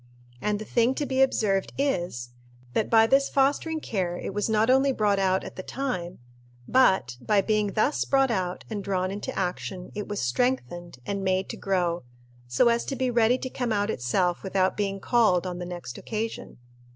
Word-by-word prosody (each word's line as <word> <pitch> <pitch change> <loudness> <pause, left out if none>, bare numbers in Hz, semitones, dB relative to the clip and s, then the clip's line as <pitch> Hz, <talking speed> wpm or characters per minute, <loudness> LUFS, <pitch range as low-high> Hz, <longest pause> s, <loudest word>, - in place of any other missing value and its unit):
And 210 0 0
the 215 - -7
thing 240 +3 +2
to 290 - -1
be 265 0 0
observed 205 -7 +1
is, 175 - -1 0.4
that 215 - 0
by 225 -1 +6
this 275 +4 +3
fostering 285 +4 +1
care 185 - -2
it - - -5
was 205 +2 -1
not 220 0 +3
only 265 +2 +4
brought 210 -5 +1
out 190 -1 +2
at - - -9
the - - -3
time, 185 -8 -4 0.5
but, 190 - +3
by 210 -2 +2
being 210 -1 0
thus 240 +7 +1
brought 270 -2 +2
out 185 -4 -2
and 210 -3 -4
drawn 185 -1 -1
into 205 +1 -4
action, 180 0 -3
it 210 0 -5
was 205 -1 -3
strengthened 175 - -1
and 200 -1 -3
made 190 0 0
to - - -4
grow, 175 -3 0 0.5
so 125 - +3
as 235 0 +1
to 270 - -3
be 260 -1 0
ready 235 +1 +3
to 260 - -5
come 245 -2 -2
out 205 0 +1
itself 175 +9 0
without 190 -1 +1
being 195 -1 -2
called, 210 -6 +3
on 180 -1 -4
the 175 - -5
next 175 -9 -7
occasion. 225 0 -5
205 Hz, 190 wpm, -26 LUFS, 185-240 Hz, 0.5 s, by